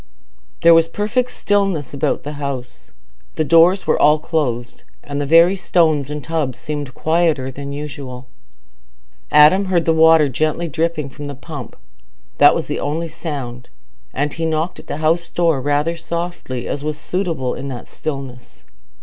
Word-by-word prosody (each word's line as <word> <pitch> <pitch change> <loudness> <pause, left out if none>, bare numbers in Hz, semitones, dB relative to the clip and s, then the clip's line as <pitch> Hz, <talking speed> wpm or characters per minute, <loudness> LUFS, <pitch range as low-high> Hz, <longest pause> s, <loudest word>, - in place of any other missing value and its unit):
There 170 0 +8
was 165 0 +5
perfect 215 +8 -1
stillness 195 - -1
about 140 - -1
the 145 - -5
house. 130 -3 -6 0.4
The 155 - +1
doors 170 +5 +4
were - - +1
all 150 +1 +6
closed, 130 -7 -2 0.2
and 145 0 -4
the 145 - -2
very 165 +5 +6
stones 160 -6 +1
and 150 -1 -5
tubs 155 -6 -2
seemed 145 -4 -5
quieter 160 -5 +1
than 140 +2 -7
usual. 140 -3 -7 1.0
Adam 150 +7 +6
heard 180 -3 +1
the 165 - +3
water 160 -1 +6
gently 155 +5 -1
dripping 160 -2 -2
from 145 +2 -9
the 145 0 -6
pump—that 140 -3 -1
was - - -2
the - - -3
only 160 +3 -2
sound—and 140 -1 -6
he 165 - -3
knocked 160 +3 -2
at - - -14
the - - -4
house 170 +2 +1
door 165 -6 +1
rather 145 +4 0
softly, 170 -7 -5
as 145 - -4
was 150 0 -3
suitable 165 -6 -2
in 140 - -6
that 125 -3 -7
stillness. 135 -5 -7
155 Hz, 155 wpm, -19 LUFS, 140-165 Hz, 1.0 s, There